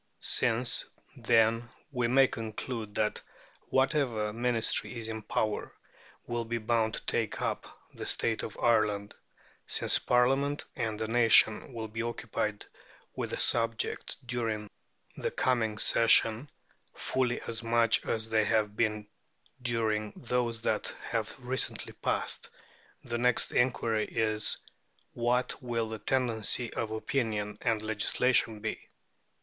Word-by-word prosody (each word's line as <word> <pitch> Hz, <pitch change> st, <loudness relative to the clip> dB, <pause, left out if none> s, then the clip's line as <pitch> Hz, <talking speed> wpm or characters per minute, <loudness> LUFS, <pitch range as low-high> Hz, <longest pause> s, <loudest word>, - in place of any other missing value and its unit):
Since, 120 Hz, +1 st, +1 dB, 0.3 s
then, 115 Hz, +1 st, +2 dB, 0.2 s
we 125 Hz, -3 st, 0 dB
may 135 Hz, +3 st, +6 dB
conclude 110 Hz, -2 st, -5 dB
that 105 Hz, -1 st, 0 dB, 0.5 s
whatever 130 Hz, -6 st, +1 dB
Ministry 120 Hz, +1 st, +1 dB
is 115 Hz, -1 st, -4 dB
in 110 Hz, -1 st, -4 dB
power 105 Hz, 0 st, -2 dB, 0.5 s
will 120 Hz, -1 st, -2 dB
be 115 Hz, +1 st, -3 dB
bound 110 Hz, -1 st, 0 dB
to -, -, -7 dB
take -, -, -1 dB
up -, -, -2 dB, 0.3 s
the -, -, -6 dB
state 115 Hz, -1 st, +1 dB
of 110 Hz, -, -7 dB
Ireland 105 Hz, -3 st, +1 dB, 0.5 s
since -, -, +3 dB
Parliament 135 Hz, +4 st, +2 dB
and 110 Hz, -4 st, -2 dB
the 110 Hz, 0 st, -3 dB
nation 115 Hz, 0 st, +5 dB
will 115 Hz, -2 st, -5 dB
be 110 Hz, +2 st, -5 dB
occupied 110 Hz, -3 st, -3 dB, 0.5 s
with -, -, -3 dB
the -, -, -3 dB
subject 115 Hz, -1 st, +1 dB
during 115 Hz, -4 st, -3 dB, 0.5 s
the -, -, -1 dB
coming 110 Hz, -4 st, 0 dB
sessions 115 Hz, +4 st, +4 dB, 0.5 s
fully 125 Hz, -2 st, -1 dB
as 115 Hz, 0 st, -3 dB
much 115 Hz, -1 st, +3 dB
as 110 Hz, 0 st, -1 dB
they 110 Hz, -1 st, +2 dB
have 105 Hz, -1 st, +1 dB
been 105 Hz, -2 st, 0 dB, 0.6 s
during 110 Hz, -3 st, 0 dB
those 120 Hz, -2 st, -1 dB
that -, -, -1 dB, 0.2 s
have 110 Hz, -2 st, -1 dB
recently 130 Hz, +1 st, -1 dB
passed -, -, -1 dB, 0.5 s
the 120 Hz, 0 st, -3 dB
next 125 Hz, 0 st, +2 dB
inquiry 115 Hz, -3 st, +1 dB
is, 110 Hz, -1 st, 0 dB, 0.6 s
What 120 Hz, +1 st, 0 dB
will 115 Hz, -3 st, -2 dB
the 110 Hz, -1 st, -5 dB
tendency 120 Hz, -1 st, 0 dB
of 115 Hz, -, -2 dB
opinion 110 Hz, -2 st, -2 dB
and 110 Hz, -2 st, 0 dB
legislation 110 Hz, +1 st, +1 dB
be? 110 Hz, -, -5 dB
115 Hz, 125 wpm, -30 LUFS, 110-120 Hz, 0.6 s, may